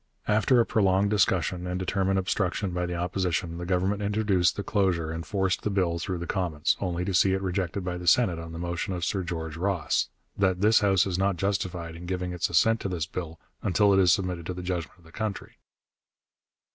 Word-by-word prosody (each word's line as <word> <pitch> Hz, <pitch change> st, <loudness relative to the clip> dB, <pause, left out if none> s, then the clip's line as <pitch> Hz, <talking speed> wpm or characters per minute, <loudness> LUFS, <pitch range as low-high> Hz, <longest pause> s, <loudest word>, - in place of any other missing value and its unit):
After 110 Hz, +4 st, +3 dB
a 115 Hz, -, +4 dB
prolonged 100 Hz, -1 st, +2 dB
discussion 90 Hz, -3 st, +1 dB
and 90 Hz, 0 st, -2 dB
determined 95 Hz, +1 st, 0 dB
obstruction 95 Hz, +1 st, -1 dB
by 90 Hz, 0 st, -2 dB
the 90 Hz, -, -3 dB
Opposition, 85 Hz, -1 st, -2 dB
the 85 Hz, -, -5 dB
Government 95 Hz, +3 st, 0 dB
introduced 100 Hz, -4 st, +2 dB
the 100 Hz, -, -4 dB
closure 95 Hz, -6 st, 0 dB
and 80 Hz, 0 st, -4 dB
forced 95 Hz, +2 st, -1 dB
the -, -, -1 dB
bill 90 Hz, -4 st, 0 dB
through 90 Hz, +1 st, -3 dB
the 85 Hz, -, -5 dB
Commons, 85 Hz, -5 st, 0 dB
only 90 Hz, -2 st, -2 dB
to 95 Hz, -, -2 dB
see 95 Hz, +2 st, +4 dB
it 95 Hz, -, -1 dB
rejected 95 Hz, 0 st, -2 dB
by 90 Hz, -1 st, -3 dB
the 90 Hz, -, -7 dB
Senate 90 Hz, -3 st, +4 dB
on 85 Hz, 0 st, -8 dB
the 80 Hz, -, -7 dB
motion 85 Hz, +2 st, -3 dB
of 90 Hz, 0 st, -2 dB
Sir 100 Hz, -, -1 dB
George 80 Hz, -3 st, -5 dB
Ross, 90 Hz, -3 st, 0 dB, 0.3 s
'that 95 Hz, -2 st, +1 dB
this 110 Hz, +2 st, +5 dB
House 95 Hz, -3 st, +3 dB
is 95 Hz, -1 st, -2 dB
not 95 Hz, -1 st, +1 dB
justified 90 Hz, -3 st, -2 dB
in 85 Hz, +1 st, -9 dB
giving 90 Hz, -1 st, -3 dB
its 90 Hz, -1 st, -1 dB
assent 110 Hz, +7 st, +3 dB
to 100 Hz, -, -3 dB
this 85 Hz, -4 st, -2 dB
bill 80 Hz, -1 st, -6 dB, 0.2 s
until 100 Hz, +2 st, +3 dB
it 95 Hz, -, +4 dB
is 90 Hz, -2 st, +5 dB
submitted 90 Hz, -3 st, -1 dB
to 90 Hz, -, -4 dB
the 90 Hz, -, -6 dB
judgment 90 Hz, -2 st, -4 dB
of 85 Hz, -, -23 dB
the 80 Hz, -, -16 dB
country.' 110 Hz, +1 st, -5 dB
90 Hz, 215 wpm, -27 LUFS, 85-100 Hz, 0.3 s, this